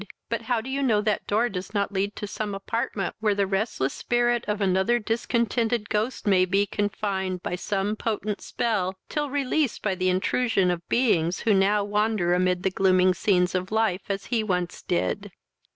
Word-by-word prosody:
But 230 0 -1
how 230 0 0
do 250 - -8
you 275 +1 -1
know 230 -6 +3
that 210 0 -1
door 220 +4 +2
does 195 -1 -6
not 200 0 0
lead 200 +1 -1
to 210 - -5
some 205 0 -4
apartment 200 -2 -2
where 215 -2 +1
the 200 0 +2
restless 195 - -1
spirit 240 0 +1
of 210 0 -1
another 190 +4 +2
discontented 230 0 0
ghost 215 +5 -1
may 190 -3 +4
be 195 +2 +2
confined, 195 -3 -2
by 180 - -2
some 200 +3 -1
potent 215 -2 -3
spell, 190 -5 -1
till 295 -1 -2
released 280 -1 0
by 210 - +1
the 185 0 0
intrusion 190 +1 +1
of 175 -1 -5
beings 180 -9 +2
who 225 - +3
now 200 +1 +3
wander 205 -3 +1
amid 180 0 +1
the 190 - +1
gloomy 185 -1 +4
scenes 180 -1 +2
of 185 +1 -2
life 215 -4 +1
as 195 0 -2
he 225 -2 +2
once 180 -4 -2
did?" 90 +1 -2
205 Hz, 185 wpm, -25 LUFS, 185-225 Hz, -, may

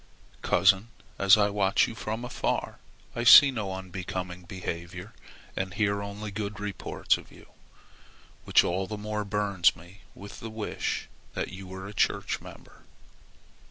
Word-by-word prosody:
Cousin, 95 +4 +3 0.3
as 100 +1 +7
I 105 -1 +2
watch 100 -1 +2
you - - -6
from 110 +1 -4
afar, 125 - -2 0.4
I 120 - -2
see 135 +3 +10
no 105 -6 -3
unbecoming 90 -1 -6
behavior 90 +2 -6 0.4
and 95 0 -3
hear 100 -2 +1
only 100 +1 -6
good 105 0 -5
reports 105 -1 -1
of - - -15
you, - - -17 0.9
which - - +5
all 95 +2 -1
the 105 - -5
more 105 0 -3
burns 100 -3 +2
me 85 +4 -16
with 100 0 -10
the 115 - -7
wish 110 -1 -3 0.3
that - - -2
you 95 0 -9
were 95 0 -8
a 100 - -9
church - - 0
member. - - -14
100 Hz, 150 wpm, -28 LUFS, 95-105 Hz, 0.9 s, see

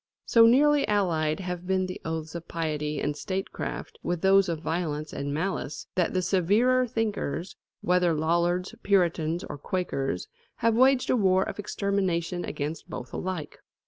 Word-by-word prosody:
So 230 -1 +6
nearly 290 +4 +4
allied 170 -5 +1
have 180 -1 -5
been 190 0 +1
the 185 - -6
oaths 160 -1 -4
of 170 -1 -7
piety 150 -2 -2
and 145 - -1
statecraft 190 +5 -5
with 175 -1 -2
those 195 -1 +5
of 165 -2 -2
violence 155 -2 -3
and 140 0 -3
malice, 160 -1 -3
that 180 0 0
the 185 - +1
severer 210 +8 +3
thinkers, 215 - -2 0.3
whether 180 -1 +3
Lollards, 175 +5 +1
Puritans, 175 -4 +1
or 145 - -7
Quakers, 135 - -2 0.3
have 230 0 +2
waged 260 +2 +4
a - - +4
war 190 -4 +3
of - - -6
extermination 190 -4 -1
against 150 +2 -4
both 125 - -7
alike. 180 -5 -4
180 Hz, 150 wpm, -27 LUFS, 160-195 Hz, 0.3 s, So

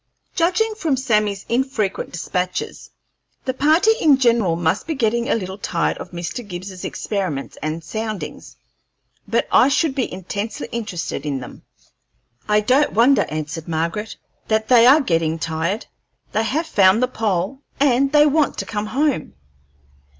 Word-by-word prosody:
Judging 370 +6 +1
from 320 -10 -1
Sammy's 210 -6 0
infrequent 235 -5 -1
despatches, 180 +1 -3 0.6
the 260 - -1
party 310 +10 +4
in 290 -4 +5
general 235 -9 +2
must 170 - 0
be 320 - -2
getting 235 0 0
a - - +3
little 190 -2 -5
tired 170 -3 -1
of - - -7
Mr. 175 +7 -5
Gibbs's 185 0 -7
experiments 185 -10 -3
and 155 +2 -3
soundings; 210 -5 -6 0.7
but - - 0
I - - +6
should 290 +1 +1
be 265 -2 -2
intensely 200 +4 -5
interested 210 -9 -4
in 145 -3 -2
them." 125 - -10 0.9
"I 210 0 +4
don't 260 +7 +2
wonder," 245 +6 +4
answered 155 +1 -5
Margaret, 170 +6 -2 0.3
"that 220 0 0
they 240 -2 +7
are 290 +5 +7
getting 165 - 0
tired; 165 +6 -2 0.5
they 220 +1 0
have 310 +8 -1
found 200 -5 +4
the - - +3
pole, 215 0 -2 0.2
and 275 -1 +3
they 295 0 +6
want 300 -1 +2
to - - -3
come 210 -1 -3
home. 265 - -1
215 Hz, 150 wpm, -21 LUFS, 180-265 Hz, 0.9 s, they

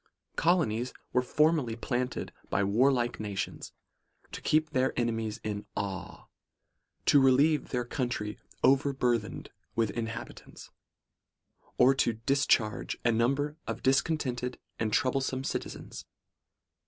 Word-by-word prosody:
' - - -47
Colonies, 125 -10 +2
says - - -12
he, - - -36
were 125 - +4
formerly 150 -3 +2
planted 125 +1 -3 0.2
by 100 - +1
warlike 120 +4 +2
nations, 100 -2 -4 0.6
to - - -7
keep 155 0 +2
their 130 -2 +1
enemies 115 -2 -1
in 105 -1 -4
awe; 95 -2 -5 0.8
to 145 - +6
relieve 140 +4 +4
their 125 -1 -1
country 120 -4 -3 0.2
overburthened 130 -5 +1 0.2
with 115 -3 +1
inhabi 115 0 -4
tants; - - -14 1.1
or 130 +2 +6
to 125 -3 +1
discharge 115 -2 +1
a 120 - +5
number 140 +6 +1
of - - -4
discontented 130 -3 +1 0.2
and 110 -1 0
troublesome 130 +2 +1
citizens. - - -5
125 Hz, 120 wpm, -30 LUFS, 115-135 Hz, 1.1 s, to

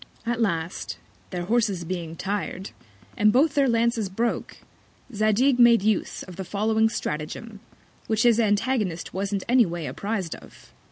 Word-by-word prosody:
At 235 0 -1
last, 170 -5 -2 0.3
their 180 -2 -4
Horses 210 -3 +1
being 170 -2 -5
tired, 195 0 -4 0.4
and 210 0 +4
both 275 +6 +3
their 275 -2 +3
Lances 230 -3 +1
broke, 230 +5 -2 0.6
Zadig 220 +5 +2
made 235 -3 +6
use 215 -1 0
of 180 -2 -11
the 190 - -4
following 220 +3 +1
Stratagem, 205 +5 -5 0.5
which 220 0 +1
his 235 -2 +5
Antagonist 210 -4 0
wasn't 195 +1 -2
any 245 -3 +5
ways 170 -2 -4
appriz'd 200 -5 -3
of. - - -15
210 Hz, 145 wpm, -25 LUFS, 185-235 Hz, 0.6 s, made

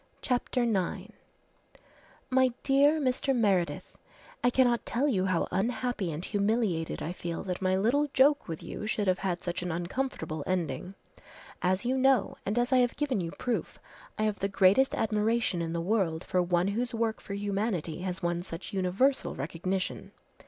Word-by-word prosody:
CHAPTER 250 0 0
IX 200 -7 -1 1.2
"My 260 -1 +4
dear 285 +3 +4
Mr. 265 0 +1
Meredith, 195 -7 0 0.5
"I 245 - +5
cannot 245 -2 +3
tell 260 +5 0
you 195 -9 +1
how 185 -3 +1
unhappy 230 -2 -1
and 155 +3 -4
humiliated 205 -5 0
I 165 - -3
feel 170 -2 -5
that 180 -1 -4
my 185 0 +2
little 255 +9 +2
joke 285 +2 +4
with 165 -2 -6
you 210 - -6
should 215 -1 0
have 185 -1 +2
had 180 -2 -2
such 175 -1 -3
an 180 0 -3
uncomfortable 170 - -3
ending. 185 +1 -2 0.7
As 185 +4 +1
you 260 +2 +1
know, 265 -5 +3
and 205 +4 0
as 245 +2 +2
I - - +6
have 245 -1 +2
given 280 -9 0
you 165 - -3
proof, 245 -2 -3 0.4
I 215 - 0
have 215 -1 0
the 195 - 0
greatest 200 +7 +4
admiration 220 -3 +1
in 165 -1 -2
the 170 - -2
world 180 -4 0
for 180 - +1
one 175 +1 +1
whose 235 +3 -2
work 225 -1 -1
for 200 - -6
humanity 200 -5 -2
has 185 0 -4
won 175 0 0
such 175 +1 -8
universal 195 +9 +1
recognition. 175 +6 -3
200 Hz, 170 wpm, -29 LUFS, 180-245 Hz, 1.2 s, I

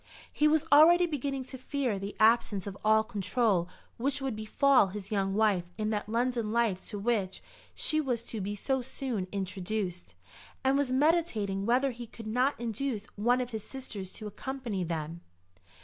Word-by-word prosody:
He 300 - +3
was 305 0 +3
already 335 +5 +8
beginning 280 -4 -3
to 260 0 -9
fear 255 -6 -1
the 200 +1 -6
absence 215 -3 +3
of 200 -2 -5
all 220 0 +5
control 205 -3 0 0.3
which 275 +4 0
would 270 -4 -2
befall 215 +2 +3
his 195 +1 -7
young 195 -2 0
wife 205 -5 +2
in 215 0 -1
that 210 -1 -2
London 235 -1 0
life 225 -5 +1
to 210 - -5
which, 200 -3 -1 0.3
she 310 -1 +1
was 245 -5 -2
to 225 -2 -5
be 205 +2 -3
so 265 +6 -1
soon 245 -6 -4
introduced, 190 - -3 0.5
and 265 +1 +3
was 280 -2 +1
meditating 255 - +1
whether 260 +3 +3
he 240 0 -8
could 225 0 -11
not 250 +6 +1
induce 235 -1 -3
one 245 +5 +2
of 250 0 -4
his 220 -2 -4
sisters 220 -8 -6
to 215 - -7
accompany 230 -2 -4
them. 165 0 -4
225 Hz, 170 wpm, -30 LUFS, 200-265 Hz, 0.5 s, already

